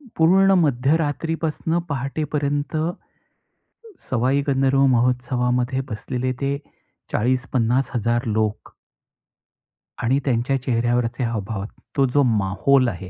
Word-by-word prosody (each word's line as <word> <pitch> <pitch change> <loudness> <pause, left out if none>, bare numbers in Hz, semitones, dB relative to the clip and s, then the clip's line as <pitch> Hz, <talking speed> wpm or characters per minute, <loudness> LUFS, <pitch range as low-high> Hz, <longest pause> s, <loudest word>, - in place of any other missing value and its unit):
पूर्ण 190 +4 +5
मध्यरात्रीपासनं 160 +3 0
पहाटेपर्यंत, 145 +1 -2 1.3
सवाई 130 +3 +1
गंधर्व 135 0 +3
महोत्सवामध्ये 125 +1 0
बसलेले 125 +4 -3
ते 140 0 0 0.6
40-50हजार 125 -1 0
लोक. 110 -1 -2 1.3
आणि 130 +4 +2
त्यांच्या 130 +1 +1
चेहऱ्यावरचे 120 0 0
हावभाव 110 -3 -3 0.3
तो 135 - +5
जो 145 -1 +4
माहोल 125 +7 +2
आहे 90 -1 -7
130 Hz, 85 wpm, -22 LUFS, 120-140 Hz, 1.3 s, पूर्ण